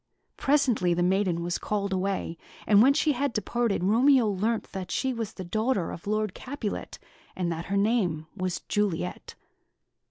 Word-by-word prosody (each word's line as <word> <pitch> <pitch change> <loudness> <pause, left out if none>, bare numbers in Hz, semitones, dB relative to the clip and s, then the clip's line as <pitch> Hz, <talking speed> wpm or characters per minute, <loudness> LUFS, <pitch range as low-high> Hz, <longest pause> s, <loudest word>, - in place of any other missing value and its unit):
Presently, 250 -11 +2
the 175 - +1
maiden 180 -2 +1
was 175 0 -2
called 200 -2 -2
away, 190 -2 -1 0.3
and 205 -1 +6
when 275 +4 +6
she 310 0 +3
had 280 -1 -1
departed, 230 -2 0
Romeo 240 +5 +4
learnt 210 +3 -1
that 185 -2 -5
she 265 -1 0
was 230 -3 -4
the 185 - -7
daughter 215 +1 0
of 170 - -9
Lord 215 -2 0
Capulet, 255 -6 -5 0.4
and 175 -2 -1
that 165 +1 -4
her 200 - -1
name 200 -7 +1
was 185 -2 -2
Juliet. 190 -4 -2
205 Hz, 160 wpm, -27 LUFS, 180-235 Hz, 0.4 s, and